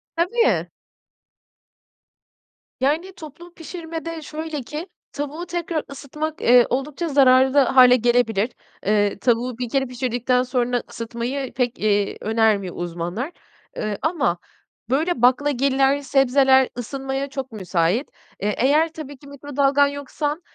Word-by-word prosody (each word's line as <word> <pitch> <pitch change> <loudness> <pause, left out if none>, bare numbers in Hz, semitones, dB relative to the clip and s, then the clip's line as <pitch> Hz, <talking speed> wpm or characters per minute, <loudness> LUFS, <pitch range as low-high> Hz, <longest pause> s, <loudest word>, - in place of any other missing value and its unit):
Tabii. 420 +9 +1 2.1
Yani, 310 +8 0
toplu 340 +1 -12
pişirmede 330 -1 -7
şöyle 310 0 -5
ki; 300 +8 -7 0.2
tavuğu 290 +4 -5
tekrar 340 -2 -3
ısıtmak, 300 +3 -5
eee, 245 0 +6
oldukça 275 +6 -2
zararlı 265 -1 +5
hâle 255 -2 +6
gelebilir. 235 -3 +2 0.4
Eee, 205 -1 +1
tavuğu 240 0 0
1 245 -1 -4
kere 270 +2 +1
pişirdikten 250 0 0
sonra 245 -1 -1
ısıtmayı 240 +4 -4
pek, 245 -1 -1
eee, 205 -1 +1
önermiyor 215 -4 +1
uzmanlar. 175 - -4 0.5
Iıı, 215 -1 -2
ama 295 - 0 0.5
böyle 295 +1 0
baklagiller, 270 +1 +3
sebzeler 270 -1 +4
ısınmaya 270 +3 -4
çok 270 -1 -6
müsait. 190 - 0 0.3
Eee, 210 +1 0
eğer 300 +6 +3
tabii 290 -3 -8
ki 285 - -16
mikrodalgan 285 0 +1
yoksan, 290 +2 -4
270 Hz, 115 wpm, -22 LUFS, 240-295 Hz, 2.1 s, eee